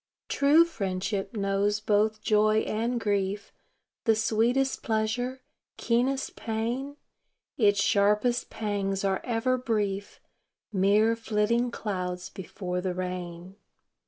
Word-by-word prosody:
True 295 +4 +5
friendship 195 - -3
knows 200 +1 +1
both 215 +1 +1
joy 215 0 +3
and 235 +3 -1
grief, 205 -1 -1 0.5
The 225 -2 +4
sweetest 230 +5 +1
pleasure, 240 +4 -1 0.3
keenest 255 +3 0
pain; 240 +6 -3 0.6
Its 205 -3 +3
sharpest 210 +3 +2
pangs 200 -2 -2
are 190 -1 0
ever 250 +2 0
brief, 205 -5 -2 0.5
Mere 210 +4 +3
flitting 230 +2 +1
clouds 180 -5 -4
before 180 -1 -5
the 180 -1 -2
rain. 180 0 -5
215 Hz, 100 wpm, -28 LUFS, 195-235 Hz, 0.6 s, True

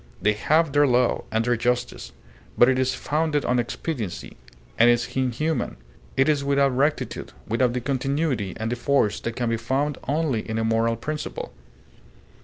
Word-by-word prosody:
They 105 +3 +2
have 155 +8 +2
their 145 0 +5
law, 125 -1 +2
and 110 +1 +1
their 120 0 +2
justice. 125 +1 -2 0.5
But 120 - +6
it 130 0 +2
is 130 0 +1
founded 150 -1 0
on 125 0 +2
expediency, 120 - -4 0.4
and 120 +1 +7
is 120 0 +1
inhuman; 130 +5 -1 0.4
it 135 - +4
is 150 -2 +2
without 140 -1 +2
rectitude, 145 +4 -1
without 120 +2 +1
the 125 - -2
continuity 135 - -1
and 110 +1 -3
the - - 0
force 120 -4 +1
that 115 0 -4
can 120 -2 -1
be 115 - +1
found 135 +5 -1
only 145 -5 0
in 110 - -2
a 115 - 0
moral 115 +1 +1
principle. 150 +6 -5
125 Hz, 170 wpm, -24 LUFS, 115-145 Hz, 0.5 s, and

